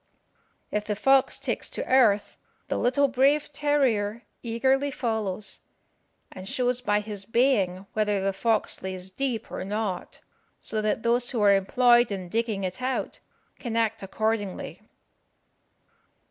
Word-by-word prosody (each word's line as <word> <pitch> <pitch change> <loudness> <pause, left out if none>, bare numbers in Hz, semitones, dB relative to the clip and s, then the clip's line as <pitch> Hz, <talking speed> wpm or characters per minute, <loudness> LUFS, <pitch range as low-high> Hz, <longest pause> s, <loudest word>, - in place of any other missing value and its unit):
If 210 0 -1
the 210 - -2
fox 270 +5 +3
takes - - -3
to - - -4
earth, 225 -6 +3 0.3
the - - 0
little 270 +3 +3
brave 275 +3 +2
terrier 245 -7 +1 0.2
eagerly 265 +4 +1
follows, 220 -6 -3 0.7
and 190 +1 -9
shows 250 -1 0
by 210 -4 +1
his 205 -2 -3
baying 200 -5 +1
whether 210 -2 +1
the 195 0 0
fox 220 +2 0
lays 190 0 -6
deep 250 0 -3
or - - -4
not, 200 -2 -4 0.4
so 215 - -2
that 215 +1 -1
those 240 +1 +1
who 235 -4 -2
are 200 -1 +6
employed 240 +4 +4
in 185 -3 -5
digging 220 -2 -1
it 185 +6 -4
out 255 0 -2 0.4
can 235 -3 -4
act 225 -1 0
accordingly. 205 0 -3
220 Hz, 135 wpm, -26 LUFS, 200-250 Hz, 0.7 s, are